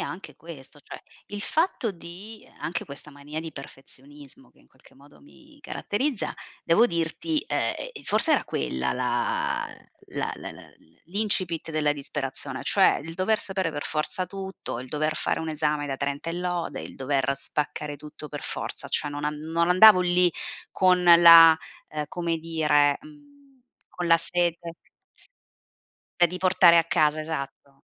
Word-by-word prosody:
anche 185 Hz, -, -7 dB
questo: 150 Hz, -3 st, -13 dB
cioè -, -, -10 dB, 0.3 s
il 205 Hz, 0 st, -7 dB
fatto 310 Hz, -, 0 dB
di, 190 Hz, +5 st, -11 dB
ehm -, -, -23 dB
anche 170 Hz, +1 st, -3 dB
questa 140 Hz, +1 st, -11 dB
mania 145 Hz, +2 st, -8 dB
di 160 Hz, -1 st, -8 dB
perfezionismo 140 Hz, +1 st, -13 dB
che -, -, -30 dB
in -, -, -26 dB
qualche -, -, -24 dB
modo 140 Hz, +2 st, -20 dB
mi 295 Hz, +1 st, -20 dB
caratterizza, 255 Hz, -1 st, -3 dB, 0.3 s
devo 215 Hz, +8 st, +5 dB
dirti, 170 Hz, -, -2 dB
e -, -, -3 dB
ehm, -, -, -10 dB
forse 320 Hz, -, +3 dB
era 290 Hz, -, +2 dB
quella 65 Hz, 0 st, -2 dB
la -, -, -1 dB, 0.5 s
la -, -, -1 dB
la -, -, -8 dB
la -, -, -12 dB
la -, -, -16 dB, 0.4 s
l'incipit 185 Hz, -4 st, -1 dB
della 155 Hz, -2 st, +1 dB
disperazione; 135 Hz, -1 st, -5 dB
cioè 195 Hz, -2 st, +4 dB
il 165 Hz, +1 st, -8 dB
dover 200 Hz, +5 st, +1 dB
sapere 190 Hz, -3 st, -2 dB
per 145 Hz, -1 st, -5 dB
forza 155 Hz, +4 st, -2 dB
tutto, 190 Hz, -9 st, -6 dB
il 130 Hz, -, -9 dB
dover 155 Hz, +2 st, -1 dB
fare -, -, -1 dB
un 160 Hz, -, -4 dB
esame 150 Hz, -1 st, -1 dB
da 135 Hz, -1 st, -3 dB
30 140 Hz, +4 st, -3 dB
e -, -, -4 dB
lode, 175 Hz, -1 st, -3 dB
il -, -, -9 dB
dover 135 Hz, 0 st, 0 dB
spaccare 145 Hz, +1 st, -4 dB
tutto 150 Hz, +1 st, -10 dB
per 145 Hz, -1 st, -7 dB
forza, -, -, -5 dB
cioè 150 Hz, -, 0 dB
non 145 Hz, 0 st, -5 dB
an 150 Hz, 0 st, -2 dB
non 165 Hz, +2 st, -1 dB
andavo 185 Hz, +2 st, +8 dB
lì 180 Hz, 0 st, +3 dB, 0.4 s
con 185 Hz, -1 st, +3 dB
la 165 Hz, -2 st, +9 dB, 0.3 s
ehm, 150 Hz, -1 st, -4 dB
come 170 Hz, -1 st, -2 dB
dire, 150 Hz, -3 st, +2 dB
mhmm, 295 Hz, -1 st, -17 dB, 0.5 s
con 175 Hz, -, -4 dB
la 165 Hz, 0 st, +6 dB
sete 170 Hz, 0 st, -1 dB, 1.5 s
e 175 Hz, -, +6 dB
di 180 Hz, +2 st, -6 dB
portare 180 Hz, -2 st, +5 dB
a 165 Hz, -, +5 dB
casa 155 Hz, -2 st, +2 dB
esatto, 140 Hz, -3 st, -7 dB
165 Hz, 165 wpm, -25 LUFS, 150-185 Hz, 1.5 s, la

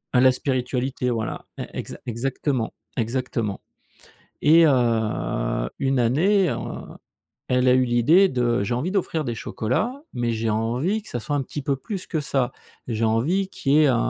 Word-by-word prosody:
A 125 Hz, -, +6 dB
la 130 Hz, 0 st, +7 dB
spiritualité, 125 Hz, 0 st, -1 dB
voilà, 115 Hz, -2 st, -3 dB
e -, -, -3 dB
exa -, -, -6 dB
exactement, 125 Hz, +1 st, -2 dB, 0.2 s
exactement. 115 Hz, -3 st, -2 dB, 0.8 s
Et 165 Hz, +2 st, +6 dB
heu, 115 Hz, -, +1 dB
une 135 Hz, -1 st, +1 dB
année, 175 Hz, -, +3 dB
heu, -, -, -1 dB, 0.9 s
elle 125 Hz, 0 st, +2 dB
a 125 Hz, -, +6 dB
eu 130 Hz, -, +4 dB
l'idée 135 Hz, +11 st, +5 dB
de: 120 Hz, -, +1 dB
«J'ai 120 Hz, -, -1 dB
envie 140 Hz, +9 st, -1 dB
d'offrir 180 Hz, -5 st, 0 dB
des 120 Hz, -2 st, -3 dB
chocolats 130 Hz, -, -1 dB, 0.2 s
mais 120 Hz, -1 st, -1 dB
j'ai 110 Hz, 0 st, -1 dB
envie 125 Hz, -, 0 dB
que -, -, -13 dB
ça 120 Hz, -, -3 dB
soit 145 Hz, +6 st, -2 dB
un 140 Hz, -, 0 dB
petit 145 Hz, +3 st, -6 dB
peu 135 Hz, 0 st, 0 dB
plus 185 Hz, +8 st, -6 dB
que 160 Hz, -, -1 dB
ça. 135 Hz, -4 st, 0 dB, 0.4 s
J'ai 115 Hz, -1 st, 0 dB
envie 145 Hz, -, +1 dB
qu'il 140 Hz, -7 st, 0 dB
y -, -, +6 dB
ait -, -, +5 dB
un 130 Hz, -4 st, +3 dB
125 Hz, 175 wpm, -24 LUFS, 115-150 Hz, 0.9 s, la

